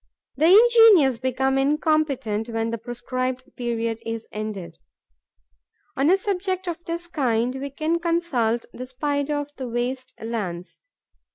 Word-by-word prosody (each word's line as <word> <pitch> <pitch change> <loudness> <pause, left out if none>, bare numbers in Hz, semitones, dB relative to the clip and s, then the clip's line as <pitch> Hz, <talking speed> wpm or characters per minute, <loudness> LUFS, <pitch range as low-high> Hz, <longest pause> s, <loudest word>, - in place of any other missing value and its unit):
The 305 +4 +3
ingenious 415 - +7
become 265 +1 0
incompetent 275 -6 0
when 225 0 -2
the 230 - -3
prescribed 255 +2 -4
period 230 -2 -2
is 225 0 -5
ended. 205 -6 -6 1.2
On 275 +3 +2
a 375 - +5
subject 375 -1 -2
of 345 -1 -5
this 340 +1 -4
kind, 250 -7 0
we 280 - -4
can 315 +4 -1
consult 315 -10 0
the 255 - -7
Spider 285 +3 -1
of 290 0 -4
the 260 - -5
waste 250 +2 -3
lands. 200 -6 -5
260 Hz, 130 wpm, -24 LUFS, 230-315 Hz, 1.2 s, ingenious